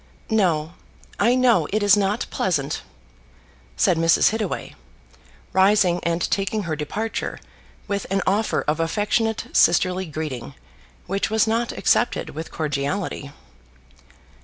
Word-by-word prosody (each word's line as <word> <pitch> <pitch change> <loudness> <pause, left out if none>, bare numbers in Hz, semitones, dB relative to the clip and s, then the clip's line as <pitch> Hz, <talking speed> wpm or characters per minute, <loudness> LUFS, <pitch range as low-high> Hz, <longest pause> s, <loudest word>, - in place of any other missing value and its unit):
"No; 175 -7 +1 0.5
I 235 +4 +4
know 255 -2 +3
it 210 +1 0
is 205 -1 +6
not 205 +2 0
pleasant," 150 -7 -1 1.0
said 170 - +3
Mrs. 165 +2 +4
Hittaway, 220 -1 -3 0.8
rising, 190 -2 +4
and 170 0 0
taking 200 +2 0
her 160 -3 -2
departure 200 +10 -4 0.5
with 200 -1 -2
an 195 0 0
offer 205 +3 +1
of 150 +2 0
affectionate 210 +6 0
sisterly 180 +2 +3
greeting, 145 - -5 0.5
which 195 +2 -1
was 220 0 +3
not 230 +2 0
accepted 240 - +1
with 160 +2 -7
cordiality. 145 0 -3
190 Hz, 115 wpm, -22 LUFS, 160-215 Hz, 1.0 s, is